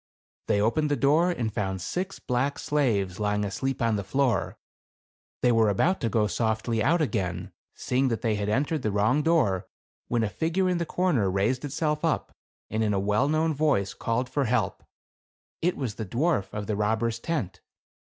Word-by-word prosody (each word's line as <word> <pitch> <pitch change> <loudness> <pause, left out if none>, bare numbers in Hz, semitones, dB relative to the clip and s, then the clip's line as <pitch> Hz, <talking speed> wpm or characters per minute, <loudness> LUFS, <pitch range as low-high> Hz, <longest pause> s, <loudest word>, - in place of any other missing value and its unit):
They 100 - +2
opened 145 +9 +1
the 145 - +2
door 150 +6 +3
and 115 -11 -2
found 95 -2 -2
six 185 - -3
black 130 +3 -1
slaves 110 -11 0
lying 105 0 0
asleep 130 +6 -2
on 115 -2 +2
the 100 - -3
floor. 125 0 0 0.9
They 125 - +5
were 115 -2 +4
about 170 - +1
to 115 - 0
go 110 0 +2
softly 110 +3 0
out 160 +8 +3
again, 95 - -2 0.2
seeing 130 +2 0
that 115 -1 -2
they 115 -2 +2
had 105 0 -2
entered 145 +6 0
the 110 - 0
wrong 105 +8 +2
door, 105 - +2 0.4
when 120 -2 +1
a - - +1
figure 170 - 0
in 180 -1 +1
the 170 - -2
corner 150 - +1
raised 105 +8 0
itself 150 +1 -1
up, 165 -2 -1 0.3
and 110 +1 -1
in 105 -2 +1
a - - +1
well 105 +8 +1
known 155 +1 +2
voice, 140 -10 +1
called 115 +2 -1
for 135 +2 0
help. 115 -4 0 0.8
It 180 +2 +1
was 130 -7 -3
the 110 - -5
dwarf 125 - 0
of 105 -1 -4
the 105 - -1
robber's 110 +2 0
tent. 130 - -3
120 Hz, 185 wpm, -27 LUFS, 105-150 Hz, 0.9 s, They